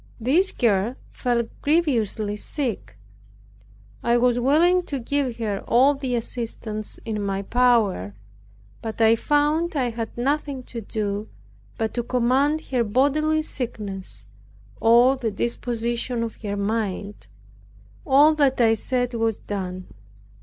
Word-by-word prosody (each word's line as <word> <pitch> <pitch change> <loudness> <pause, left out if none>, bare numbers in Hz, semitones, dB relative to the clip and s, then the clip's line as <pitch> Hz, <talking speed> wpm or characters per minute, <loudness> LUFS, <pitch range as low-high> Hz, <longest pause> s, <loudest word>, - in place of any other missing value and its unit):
This 310 - +2
girl 220 +1 +1 0.2
fell 240 -2 0 0.2
grievously 235 - +1
sick. 210 - -4 1.0
I 235 0 +2
was 245 0 +2
willing 330 +8 +4
to 280 - -2
give 260 -1 -2
her 210 -4 -2
all 260 +5 +5
the 265 -3 -3
assistance 225 -2 -5
in 215 -2 -3
my 195 -1 -2
power, 220 - +2 0.7
but 220 -1 -6
I 225 0 +6
found 300 +6 +1
I 250 -4 0
had 225 0 -6
nothing 275 +1 -1
to 235 -1 -7
do 205 0 -3 0.5
but 220 -1 -2
to 240 - -1
command 255 +6 +1
her 250 -3 +2
bodily 290 +7 +2
sickness, 195 - -6 0.5
or 240 +4 +5
the 240 -3 -1
disposition 235 +2 -2
of 230 - -6
her 205 -2 -3
mind; 205 -1 -3 0.8
all 290 +2 +5
that 280 -4 +2
I 225 -2 +5
said 245 +2 -1
was 225 -2 0
done. 185 -2 -5
235 Hz, 125 wpm, -23 LUFS, 215-270 Hz, 1.0 s, I